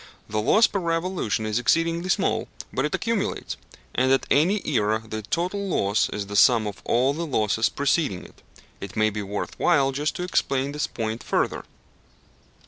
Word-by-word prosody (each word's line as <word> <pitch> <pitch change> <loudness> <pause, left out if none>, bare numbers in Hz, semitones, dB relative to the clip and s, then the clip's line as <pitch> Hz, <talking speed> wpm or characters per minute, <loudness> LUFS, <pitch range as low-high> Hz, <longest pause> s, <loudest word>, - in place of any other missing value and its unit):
The 105 +1 -1
loss 215 - +5
per 200 - -1
revolution 165 - -1
is 110 +2 0
exceedingly 165 +7 +1
small, - - +1 0.3
but 130 - 0
it 150 - -1
accumulates, 215 -2 -2 0.4
and 130 +1 +2
at 135 - +3
any 185 +8 +3
era 110 -5 +1
the 110 0 -4
total 180 - -2
loss 100 - +1
is 105 -1 -4
the 100 +1 -7
sum 115 +1 +5
of 105 -1 -6
all 130 +4 +2
the 165 +2 -4
losses 110 -4 +1
preceding 140 - 0
it. - - -17 0.4
It - - -8
may 110 0 +2
be 105 0 -4
worth 100 +1 -5
while 135 -1 +3
just 145 +3 -2
to 180 - -3
explain 140 -6 0
this 150 0 -2
point 110 0 -4
further. - - -1
135 Hz, 175 wpm, -24 LUFS, 110-170 Hz, 0.4 s, loss